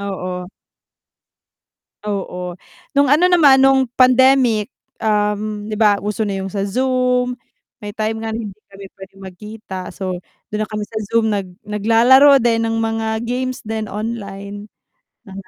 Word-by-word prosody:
Oo. 180 -1 -5 1.5
Oo, 180 -3 -4 0.4
nung 285 - +5
ano 305 +7 +4
naman 290 -7 +6
nung 270 -1 +4
pandemic, 255 -3 +4 0.2
um, 210 0 -1
di 215 - -4
ba 205 -2 +3
uso 210 +1 -2
na 195 -1 -3
yung 190 - -5
sa 195 +1 -2
Zoom, 250 +2 0 0.4
may 205 -1 -8
time 220 0 -2
nga 225 -1 -4
hindi 215 -3 -6 0.2
kami 195 0 -10
pwedeng 195 0 -13
magkita 190 0 -8
so 185 -2 -4 0.4
dun 215 - -1
na - - -22
kami 210 -1 -4
sa 220 +1 -8
Zoom 225 -1 +2
nag 195 -2 -3 0.2
naglalaro 230 +7 +5
din 230 -1 +2
ng 225 0 -1
mga 225 0 -2
games 255 +1 -3
din 220 0 -3
online, 205 -2 -6 0.6
mga 195 -1 -10
215 Hz, 145 wpm, -18 LUFS, 200-245 Hz, 1.5 s, naman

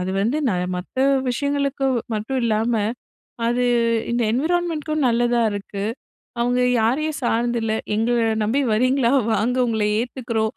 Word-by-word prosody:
அது 185 +1 -2
வந்து 240 +8 0
நான் 180 -2 -1
மத்த 185 +8 -9 0.3
விஷயங்களுக்கு 280 0 -1 0.3
மட்டும் 225 +5 -2
இல்லாம, 225 +1 +1 0.7
அது 245 +1 +1 0.5
இந்த 240 0 0
என்விரான்மெண்ட்க்கும் 310 0 0
நல்லதா 240 0 +2
இருக்கு. 200 0 -5 0.6
அவங்க 245 +1 +1 0.2
யாரையும் 300 +7 0
சார்ந்து 235 +1 +1
இல்ல. 220 -1 -1 0.2
எங்களை 230 +1 +1 0.2
நம்பி 250 +7 +1
வரீங்களா 255 +2 +2 0.2
வாங்க, 230 +5 +1
உங்களை 220 -2 0
ஏத்துக்கிறோம். 230 -3 -2
240 Hz, 125 wpm, -22 LUFS, 220-270 Hz, 0.7 s, நல்லதா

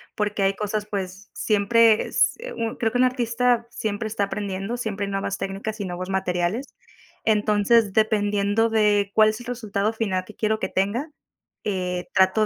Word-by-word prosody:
porque 210 -1 -1
hay 195 0 +3
cosas, 210 0 -2
pues, 195 -1 -5
siempre 215 +1 +3
s - - +2 0.2
un 225 -1 -2
creo 225 0 0
que - - +1
un 255 - +4
artista 245 -1 +1
siempre 215 -1 -3
está 215 -1 -1
aprendiendo, 195 +3 -4
siempre 210 -4 -3
nuevas 195 0 -2
técnicas 205 +3 -4
y - - -2
nuevos 185 +1 -5
materiales. 190 +6 -1 0.5
Entonces, 210 0 +3
dependiendo 205 +1 +2
de 210 -2 +2
cuál 215 0 +6
es 215 +2 -4
el 240 - -11
resultado 215 -4 -1
final 200 -5 -1
que 205 +2 -14
quiero 220 0 0
que - - -2
tenga, 215 +11 -1 0.6
eh, 180 -3 -2
trato 190 +2 +4
210 Hz, 165 wpm, -24 LUFS, 195-225 Hz, 0.6 s, cuál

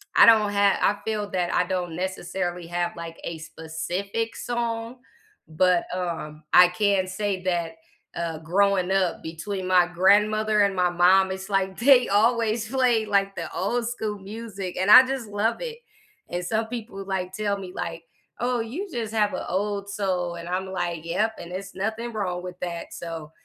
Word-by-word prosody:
I - - +9
don't 215 -3 +6
ha 200 -1 +3
I 205 - +3
feel 210 -2 -2
that, 180 -2 -1
I 180 - +3
don't 175 -2 -3
necessarily 180 -1 -3
have, 175 0 -2
like, 165 -1 -7
a 170 - -4
specific 175 +8 -4
song, 235 0 -3 0.5
but, 175 +2 +2
um, 160 -4 -4
I 180 - +8
can 190 0 +1
say 190 0 -2
that, 170 -3 -1 0.4
uh, 165 -2 -3
growing 190 +3 +2
up 190 -3 +1
between 185 +4 -5
my 180 -1 +5
grandmother 210 +4 +3
and 200 -1 +2
my 180 -1 +2
mom, 185 +2 +4
it's, 190 +1 -6
like, 195 -1 0
they 250 0 +6
always 225 +1 +2
play, 245 -4 +2
like, 195 -1 +1
the 170 - -5
old 230 +6 -1
school 220 -3 -3
music, 200 -2 -7
and 190 +2 0
I 255 +3 +11
just 265 -4 -3
love 205 +2 0
it. 470 -2 -5 0.5
And 175 0 -3
some 220 +4 -1
people, 225 -4 -6
like, 185 -1 -3
tell 205 0 -1
me, 185 -2 -8
like, 165 0 -5 0.4
"Oh, 245 +1 0
you 255 - -4
just 225 -4 -4
have 210 -2 +2
a - - -4
old 200 +1 -2
soul," 185 -4 -2
and 170 0 -8
I'm 185 +1 -2
like, 175 -3 -3
"Yep, 215 +6 0
and 170 - -9
it's 195 +2 -6
nothing 220 +4 -3
wrong 180 -4 -2
with 180 0 -8
that," 170 -1 -5
so, 165 -3 -7
195 Hz, 175 wpm, -25 LUFS, 180-215 Hz, 0.5 s, I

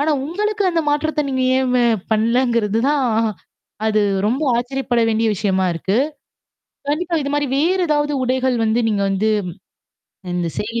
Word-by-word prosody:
ஆனா 300 +2 +1
உங்களுக்கு 420 +6 -2
அந்த 335 -1 +1
மாற்றத்த 300 +1 0
நீங்க 260 -1 0
ஏ - - +2 0.5
பண்ணலங்கிறது 230 -1 +1
தான். 290 -3 +1 0.8
அது 215 -1 +2 0.3
ரொம்ப 260 +7 0
ஆச்சரியப்பட 245 0 -1
வேண்டிய 225 0 +1
விஷயமா 190 -1 0
இருக்கு. 190 +6 -1 0.9
கண்டிப்பா 335 +3 -1
இது 280 - -3
மாரி 290 -1 0
வேறு 360 +6 +2
ஏதாவது 295 -1 +1
உடைகள் 255 0 0
வந்து 220 +2 +1
நீங்க 200 -2 0
வந்து 200 +3 +1 1.1
இந்த 175 -1 -1
செய்தி 230 +2 -3
255 Hz, 140 wpm, -19 LUFS, 220-295 Hz, 1.1 s, ஏ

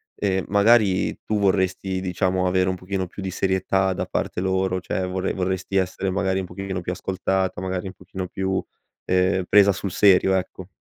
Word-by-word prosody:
ehm, 95 -2 -1
magari 100 -1 +3
tu 110 - 0
vorresti, 95 -1 +1
diciamo, 95 0 0
avere 95 0 +2
un 95 - -1
pochino 95 +1 -3
più 100 - -9
di 95 - -3
serietà 95 +1 +1
da - - -3
parte - - -3
loro? 95 0 0
Cioè 95 +1 -2
vorre 95 +1 -2
vorresti 95 +1 -2
essere, 95 0 0
magari, 95 0 0
un 95 - -3
pochino 95 +1 -5
più 90 +1 -3
ascoltata? 95 0 -1
Magari 95 0 -3
un 95 - -7
pochino 95 0 -7
più, 95 0 -1 0.4
ehm, 90 +1 +2
presa 100 -1 +6
sul 95 0 -4
serio? 95 0 +4
Ecco. 95 -1 -4
95 Hz, 180 wpm, -23 LUFS, -, 0.4 s, presa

